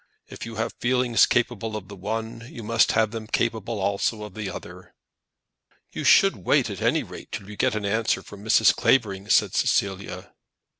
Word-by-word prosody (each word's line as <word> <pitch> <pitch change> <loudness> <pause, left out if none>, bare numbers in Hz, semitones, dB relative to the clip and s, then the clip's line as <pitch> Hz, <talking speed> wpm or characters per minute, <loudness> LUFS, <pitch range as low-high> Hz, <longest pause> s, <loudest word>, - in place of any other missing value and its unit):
If - - -8
you 115 - -8
have 110 +1 -2
feelings 125 -1 +3
capable 115 -2 -1
of 95 -3 -9
the 100 - -10
one, 110 +4 -5
you 115 - -9
must 115 +1 +3
have 110 -1 +2
them 110 -1 -6
capable 115 -1 -1
also 100 +2 -1
of 105 -3 -9
the 105 -2 -5
other!" 90 0 -10 1.0
"You - - -5
should - - +5
wait, - - +1
at - - -7
any - - +2
rate, - - -11
till 95 - -6
you 105 - -9
get 105 - +1
an 105 -1 -3
answer 105 -2 0
from 100 0 -12
Mrs. 110 - +4
Clavering," 100 -5 +1
said - - +3
Cecilia. 100 0 -1
110 Hz, 185 wpm, -24 LUFS, 100-115 Hz, 1.0 s, should